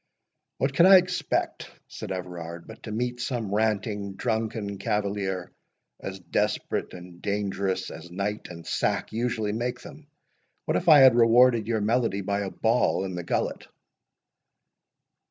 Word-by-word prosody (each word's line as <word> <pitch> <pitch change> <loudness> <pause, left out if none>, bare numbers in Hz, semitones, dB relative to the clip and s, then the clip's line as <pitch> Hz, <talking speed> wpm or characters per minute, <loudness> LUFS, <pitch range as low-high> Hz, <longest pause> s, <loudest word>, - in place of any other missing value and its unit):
"What 135 +1 0
could 170 - +7
I 195 0 +10
expect," 180 0 -1 0.2
said - - -8
Everard, 85 -2 -6
"but 110 - -12
to 110 - -7
meet 120 +2 -2
some 120 -5 -3
ranting, 105 -2 -1
drunken 110 -3 -2
cavalier, 100 -3 -2 0.5
as 95 0 -6
desperate 90 - -2
and 90 -1 -12
dangerous 100 -2 -2
as 80 +2 -10
night 100 +4 -3
and 85 -2 -10
sack - - -1
usually 110 -2 -1
make 120 +2 -3
them? 150 0 -12 0.6
What - - 0
if 175 - +1
I 150 -3 +9
had 130 -2 +8
rewarded 120 -1 +5
your 115 -2 0
melody 110 -2 +1
by 100 +1 -1
a 100 -1 -2
ball 110 -3 +1
in 95 - -5
the 90 - -4
gullet?" - - -2
105 Hz, 145 wpm, -26 LUFS, 95-120 Hz, 0.6 s, I